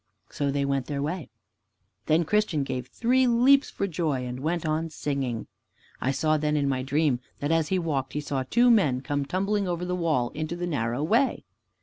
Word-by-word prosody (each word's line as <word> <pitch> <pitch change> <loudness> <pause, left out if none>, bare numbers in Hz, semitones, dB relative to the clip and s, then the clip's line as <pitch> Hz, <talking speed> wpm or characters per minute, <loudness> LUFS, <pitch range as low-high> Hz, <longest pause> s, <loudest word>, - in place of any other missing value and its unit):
So 140 -1 -1
they 140 0 0
went 140 -2 -1
their 145 -2 -3
way. 155 -1 -4 0.8
Then 160 +2 +3
Christian 205 -6 +1
gave 130 -2 -4
three 255 - +2
leaps 255 +4 +5
for 200 - -2
joy 155 -8 -1
and 125 0 -5
went 165 +4 -1
on 160 +1 -1
singing. 135 -6 -3 0.6
I 130 - 0
saw 155 +3 +2
then 150 0 0
in 140 -1 +1
my 130 -2 0
dream 140 -1 +1 0.2
that 145 +2 -1
as 165 -2 +2
he 190 - +1
walked 145 -7 -2
he 150 - -1
saw 140 -2 -2
two 240 - +4
men 150 - +3
come 145 0 -2
tumbling 195 +4 0
over 175 0 -2
the 180 0 -1
wall 155 -9 0
into 155 +2 -4
the 175 0 -3
narrow 125 -4 -1
way. 235 - +1
155 Hz, 200 wpm, -26 LUFS, 140-180 Hz, 0.8 s, leaps